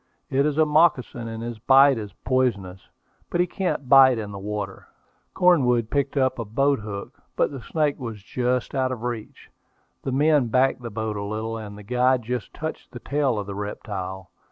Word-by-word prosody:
It 140 +2 +3
is 150 -1 -2
a 155 - +5
moccasin, 150 -6 +2
and 115 0 -6
his 120 -2 -6
bite 135 +1 +5
is 105 -2 -7
poisonous; 100 -8 -1 0.4
but 175 - -1
he 180 - +4
can't 180 -7 -3
bite 130 -2 +7
in 105 -2 -5
the 100 - -7
water." 100 -1 -5 0.5
Cornwood 125 -11 +3
picked 140 0 0
up 130 -2 +1
a - - -1
boat 135 +6 +1
hook, 100 -2 -8
but - - +1
the 135 -3 -7
snake 150 +2 -1
was 115 -6 -7
just 125 +2 -1
out 130 -2 0
of 130 - -3
his 115 - -12
reach. 120 -3 -6 0.5
The 135 - -3
men 145 -1 +3
backed 130 +2 +2
the 120 - -5
boat 110 0 -3
a 100 - -3
little, 110 +2 -3
and 105 -2 -7
the 105 - -11
guide 125 +3 +2
just 120 0 -4
touched 160 +1 -6
the 120 - -9
tail 140 -2 0
of 105 - -3
the 100 - -6
reptile. 95 -2 -6
125 Hz, 200 wpm, -24 LUFS, 105-135 Hz, 0.5 s, bite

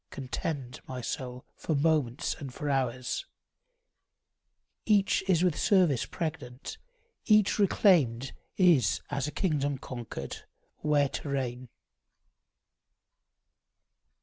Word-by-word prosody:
Contend, 130 0 -5
my 130 -1 -5
soul, 125 +1 -5
for 160 - -2
moments 145 -4 +1
and 140 -4 -8
for 145 +2 -3
hours; 125 -2 -1 1.6
Each 205 -3 +3
is 180 -3 +3
with 180 -4 +2
service 160 - +3
pregnant; 150 -5 -5 0.5
each 215 -2 +4
reclaimed 145 - +3 0.2
Is 165 - +4
as 140 -1 -1
a - - -4
kingdom 145 -4 0
conquered, 125 -3 -6 0.4
where 145 -2 +2
to 145 - -5
reign. 130 -2 -3
140 Hz, 95 wpm, -29 LUFS, 125-165 Hz, 1.6 s, each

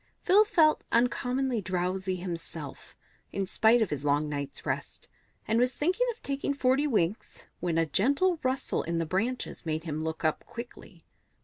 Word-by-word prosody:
Phil 405 +4 +6
felt 315 -7 +3
uncommonly 250 0 +1
drowsy 185 0 -1
himself, 165 -5 -7 0.3
in 195 - -1
spite 220 +4 +4
of 205 - -4
his 145 -1 -3
long 145 +1 +2
night's 145 -2 -5
rest, - - -4 0.4
and 225 +2 +2
was 250 +1 +1
thinking 370 +11 +2
of 465 -1 -6
taking 280 0 -2
forty 270 +2 +2
winks 210 - -1
when 170 -2 -1
a 165 - +3
gentle 285 - +2
rustle 260 +1 -1
in 170 0 -2
the 165 - 0
branches 225 +9 -2
made 160 -1 -2
him 155 -2 -3
look 160 0 -3
up 155 - +1
quickly. 235 +1 -10
210 Hz, 165 wpm, -29 LUFS, 165-265 Hz, 0.4 s, Phil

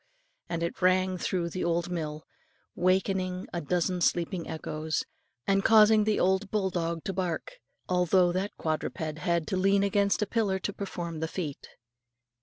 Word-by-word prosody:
and 170 -1 -2
it 170 - -4
rang 185 0 +3
through 180 -1 -1
the 185 +2 -4
old 170 +1 0
mill, 155 -3 -4 0.5
wakening 185 0 0
a 175 - -2
dozen 180 +3 0
sleeping 175 0 0
echoes, 155 -1 -3 0.4
and 195 0 +2
causing 215 -1 +6
the 215 -1 +1
old 190 +2 +2
bulldog 175 -5 -1
to 195 - -3
bark, 190 - -3 0.3
although 180 0 +3
that 190 +3 -1
quadruped 155 0 -3
had 170 0 0
to 190 - -2
lean 195 +1 +3
against 200 +1 +2
a - - 0
pillar 205 -3 0
to 195 +1 -4
perform 175 -5 -5
the 160 - -1
feat. 160 -5 -5
180 Hz, 155 wpm, -28 LUFS, 170-195 Hz, 0.5 s, causing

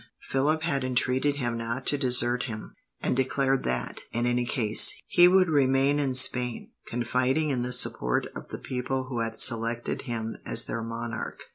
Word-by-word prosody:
Philip 150 +4 0
had 140 -5 -1
entreated 130 +2 0
him 120 -4 -4
not 115 +3 -5
to 145 - +2
desert 125 -2 +1
him, 110 -4 -8 0.3
and - - -1
declared 135 +1 0
that, 65 0 -3
in 120 +1 -2
any 120 0 -1
case, 110 -3 +4
he 175 0 +5
would 185 0 +3
remain 140 -1 +1
in 135 -3 -1
Spain, 125 -2 +3 0.2
confiding 130 +5 -1
in 125 -3 -2
the 125 +1 -4
support 60 - +2
of - - -9
the - - -7
people 130 0 -5
who 120 -3 -4
had 115 -1 -3
selected 115 +1 +3
him 115 -1 -5
as - - +2
their 115 - -5
monarch. 115 0 -7
125 Hz, 170 wpm, -26 LUFS, 115-135 Hz, 0.3 s, he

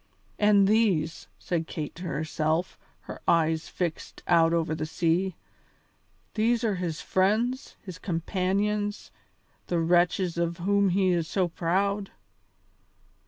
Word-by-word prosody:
"And 205 -2 +5
these," 195 -8 +1
said 165 -2 -2
Kate 150 -3 -5
to 180 - -9
herself, 155 +1 -1 0.2
her - - -9
eyes 160 -1 +2
fixed 170 -3 -4
out 165 -1 +4
over 165 -2 0
the 155 0 -3
sea, 170 +3 0 1.0
"these 230 +2 +1
are 220 -3 +1
his 170 -3 -3
friends, 225 +8 0
his 185 -3 -9
companions, 200 +4 -1 0.6
the 175 - 0
wretches 175 +1 +2
of 170 0 -1
whom 200 +2 +2
he 190 +1 +2
is 170 -2 0
so 185 -1 0
proud." 195 +4 -1
180 Hz, 120 wpm, -27 LUFS, 165-200 Hz, 1.0 s, And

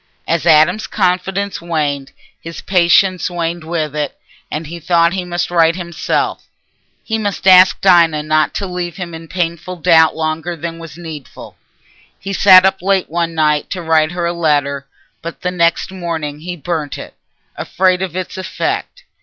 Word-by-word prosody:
As 170 +1 0
Adam's 165 +6 +4
confidence 195 0 -1
waned, 145 -5 -2 0.3
his 165 0 -8
patience 185 0 +3
waned 170 -1 -3
with 155 -2 -3
it, 150 -2 -3 0.3
and 155 +2 -4
he 170 +3 -8
thought 170 +1 +2
he 190 -1 -2
must 175 0 -3
write 165 -1 +3
himself. 170 -2 -2 0.6
He 225 -1 -2
must 205 -3 -3
ask 185 -1 +7
Dinah 170 -5 +4
not 155 0 +1
to 200 - -2
leave 180 -2 -5
him 175 -3 -6
in 165 0 -9
painful 175 0 -3
doubt 165 -2 +4
longer 160 +2 -3
than 165 0 -6
was 165 -2 -10
needful. 155 -8 -10 0.6
He 195 +1 -5
sat 185 -1 +7
up 190 0 +1
late 190 -3 0
one 170 -1 -1
night 150 -1 +1
to 185 - -4
write 160 0 +2
her 175 -1 -2
a 170 - -1
letter, 145 -4 0 0.3
but 170 0 -8
the 180 - -1
next 170 0 +1
morning 165 -5 -4
he 175 +3 -6
burnt 155 -3 -4
it, - - -9 0.4
afraid 185 0 0
of 185 -3 -4
its 185 0 -5
effect. - - -4
170 Hz, 165 wpm, -16 LUFS, 160-180 Hz, 0.6 s, ask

